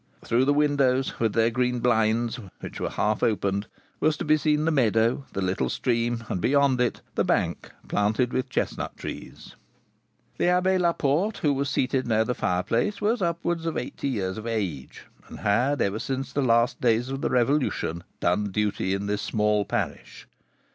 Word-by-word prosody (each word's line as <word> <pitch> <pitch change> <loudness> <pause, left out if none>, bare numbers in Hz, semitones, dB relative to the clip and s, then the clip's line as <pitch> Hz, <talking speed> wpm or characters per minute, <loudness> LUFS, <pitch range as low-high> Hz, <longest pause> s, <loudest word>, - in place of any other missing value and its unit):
Through 120 +3 +2
the 145 - +3
windows, 140 -3 +2
with 115 -2 +1
their 115 0 +3
green 125 +1 0
blinds, 115 0 +1 0.2
which - - -8
were - - -2
half 105 0 0
opened, 100 -1 0 0.3
was 155 -1 +2
to 175 - -4
be 155 0 +5
seen 150 0 +1
the 165 - +2
meadow, 115 -1 +2
the 95 - -2
little 90 -9 0
stream, 120 - -1
and, 90 - -3
beyond 140 0 +3
it, 120 - 0
the - - +1
bank - - 0 0.2
planted 110 +5 +1
with 130 - -1
chestnut - - -3
trees. - - -8 0.8
The - - +2
Abbé 180 +1 +3
Laporte, 170 +3 +1
who 145 -2 +3
was 140 0 -1
seated 130 -1 0
near 110 -1 +2
the 125 - -1
fireplace, 115 - 0
was 215 +2 +1
upwards 170 -1 -1
of 165 - -2
eighty 125 - -4
years 100 -6 -2
of 110 - -7
age, 95 - -4 0.2
and - - -10
had, 125 +8 +2
ever 100 +2 -1
since 135 +2 -4
the 140 - +1
last 115 -2 +2
days 120 +1 +2
of 135 0 -4
the - - 0
Revolution, 125 - 0 0.2
done 90 +4 +1
duty 100 -1 0
in 100 +1 -3
this 105 0 -1
small 105 -1 +1
parish. - - -4
120 Hz, 175 wpm, -26 LUFS, 105-140 Hz, 0.8 s, be